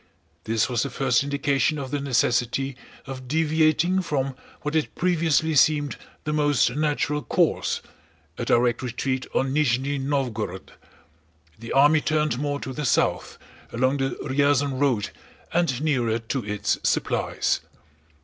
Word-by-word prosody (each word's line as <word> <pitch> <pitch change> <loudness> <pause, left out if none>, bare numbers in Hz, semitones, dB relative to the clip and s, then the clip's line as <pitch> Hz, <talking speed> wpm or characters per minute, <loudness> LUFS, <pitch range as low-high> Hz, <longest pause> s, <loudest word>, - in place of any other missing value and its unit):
This 115 0 +1
was 120 -3 0
the 140 - -1
first 125 -1 +1
indication 140 +1 0
of 135 -2 -5
the 145 - -1
necessity 130 0 0 0.3
of 130 -1 -8
deviating 160 +4 +2
from 135 -6 -2 0.3
what 150 - -2
had 160 -2 -1
previously 165 -3 +1
seemed 145 0 +3 0.3
the 150 - -2
most 145 -5 +2
natural 150 -1 0
course—a - - -2
direct 120 0 +2
retreat 130 +1 -2
on 135 0 +1
Nízhni 140 -1 +1
Nóvgorod. 120 -9 -2 0.9
The 115 - -8
army 145 +3 +5
turned 150 -5 0
more 145 0 -2
to 130 - -5
the 150 - -4
south, - - +1 0.3
along 130 +4 +1
the 135 -1 -2
Ryazán 140 -1 +1
road 125 -8 +1 0.4
and 165 -7 +1
nearer 120 -7 +1
to 115 +3 -3
its 105 0 -1
supplies. - - 0
140 Hz, 130 wpm, -24 LUFS, 125-150 Hz, 0.9 s, army